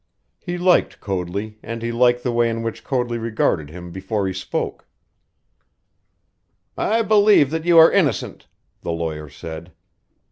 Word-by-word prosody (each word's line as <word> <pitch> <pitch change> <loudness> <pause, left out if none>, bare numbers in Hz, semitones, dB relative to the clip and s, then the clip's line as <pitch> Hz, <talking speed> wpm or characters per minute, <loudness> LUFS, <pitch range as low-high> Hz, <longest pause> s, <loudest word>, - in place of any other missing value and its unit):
He 175 -1 -5
liked 180 0 +2
Coadley, 100 +3 -4
and 115 +1 -6
he 115 - -2
liked 120 +1 +2
the 125 - 0
way 120 0 +2
in 115 0 -3
which 115 0 -5
Coadley 125 -3 -1
regarded 110 -9 -1
him 90 +2 -9
before 95 +3 -3
he 95 - -2
spoke. 95 - -4 1.9
"I 225 +2 +1
believe 205 -9 +5
that 160 0 -3
you 175 -1 +5
are 165 0 +9
innocent," 150 - 0 0.3
the - - -3
lawyer 80 -2 -4
said. 80 +3 -9
115 Hz, 145 wpm, -21 LUFS, 95-145 Hz, 1.9 s, are